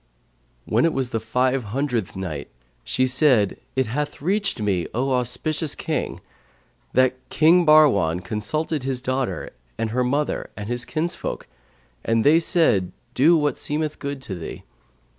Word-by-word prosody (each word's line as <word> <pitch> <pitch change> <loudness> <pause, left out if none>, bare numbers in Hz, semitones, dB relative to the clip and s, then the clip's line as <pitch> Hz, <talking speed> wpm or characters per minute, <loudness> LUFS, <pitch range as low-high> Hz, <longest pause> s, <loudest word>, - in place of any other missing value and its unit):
When - - +2
it 165 - +2
was 130 -2 -2
the 115 - 0
Five 125 +3 0
Hundredth 120 -2 -2
Night, 85 -7 -5 0.3
She 130 - +1
said, 130 -5 +3 0.2
It 130 0 +2
hath 145 +6 -3
reached 195 - -1
me, 100 -5 0
O 135 +3 0
auspicious 130 +5 -1
King, 160 -2 -3 0.7
that 130 0 +4 0.2
"King 170 +2 +4
Bahrwan 100 - +5
consulted 145 - -2
his 130 -1 -2
daughter 130 0 -2 0.3
and 115 -1 -2
her 125 +2 +1
mother 140 +4 -1
and 105 -1 -5
his 120 +1 -1
kinsfolk 155 +7 -3 0.6
and 115 0 +1
they 155 +3 +6
said, 160 - +2 0.2
'Do 160 +7 +5
what 150 -3 0
seemeth 150 0 -2
good 140 -1 -5
to 105 - -6
thee.' 85 -3 -7
130 Hz, 145 wpm, -23 LUFS, 115-150 Hz, 0.7 s, they